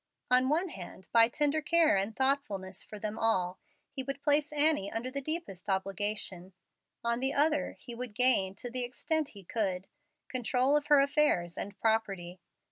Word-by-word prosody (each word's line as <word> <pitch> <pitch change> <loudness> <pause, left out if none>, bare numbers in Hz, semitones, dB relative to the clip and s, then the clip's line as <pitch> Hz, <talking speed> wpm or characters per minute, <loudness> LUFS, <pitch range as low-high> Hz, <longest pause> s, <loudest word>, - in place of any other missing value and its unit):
On 255 +1 +6
one 340 +5 +1
hand, 190 - -9
by 230 -1 +6
tender 295 +3 +1
care 320 -1 +3
and 200 +3 -1
thoughtfulness 210 -9 -1
for 210 - -9
them 210 +1 -4
all, 185 -5 +1 0.3
he 270 - -2
would 275 +1 -6
place 295 0 +3
Annie 295 -9 +2
under 240 +3 -3
the 280 +1 -2
deepest 310 - -4
obligation; 195 -1 -2 0.5
on 235 0 0
the 265 +2 0
other, 295 0 +1
he 240 - -9
would 235 -2 -5
gain, 215 -6 +4
to 240 +4 -6
the 250 0 0
extent 300 +5 -1
he 195 - -10
could, 190 -2 -2 0.4
control 255 +2 +1
of 295 -1 0
her 290 -2 +6
affairs 275 - +1
and 200 0 -6
property. 195 -6 -1
245 Hz, 170 wpm, -30 LUFS, 195-285 Hz, 0.5 s, On